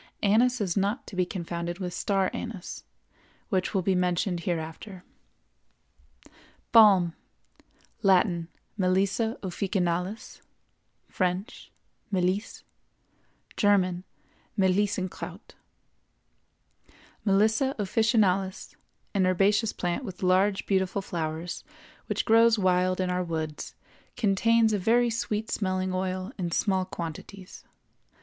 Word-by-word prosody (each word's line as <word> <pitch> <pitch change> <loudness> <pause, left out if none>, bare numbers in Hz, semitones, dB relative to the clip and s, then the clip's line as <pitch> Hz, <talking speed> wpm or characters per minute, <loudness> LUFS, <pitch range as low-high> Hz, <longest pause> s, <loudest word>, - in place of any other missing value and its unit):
Anise 240 +5 +3
is 185 -4 -1
not 200 +5 0
to - - -10
be 180 -1 +1
confounded 170 -1 -4
with 180 -2 -4
star 195 0 0
anise, 215 -6 -6 0.7
which 185 -4 0
will 190 - +1
be 190 - +2
mentioned 180 0 0
hereafter. 170 +3 -5 1.7
BALM. 195 -7 +6 0.9
Latin—Melissa 195 +2 +1
officinalis; 185 +1 -2 0.7
French—Melisse; 185 +1 -3 0.9
German—Melissenkraut. 190 0 -1 1.7
Melissa 220 +6 +2
officinalis, 200 -3 +1 0.4
an 190 -3 +2
herbaceous 205 +4 +2
plant 175 +8 -2
with 190 -5 -8
large, 190 +2 +2
beautiful 190 0 0
flowers, 165 -1 -4 0.4
which - - -1
grows 230 0 +5
wild 185 -1 +2
in 185 -1 0
our 180 0 0
woods, 160 -3 -5 0.4
contains 225 +1 +3
a 205 - +1
very 235 +5 +3
sweet 220 -1 -2
smelling 185 -2 -1
oil 185 +2 -2
in 175 -2 -1
small 190 +2 +1
quantities. 180 +2 -8
190 Hz, 90 wpm, -27 LUFS, 180-210 Hz, 1.7 s, BALM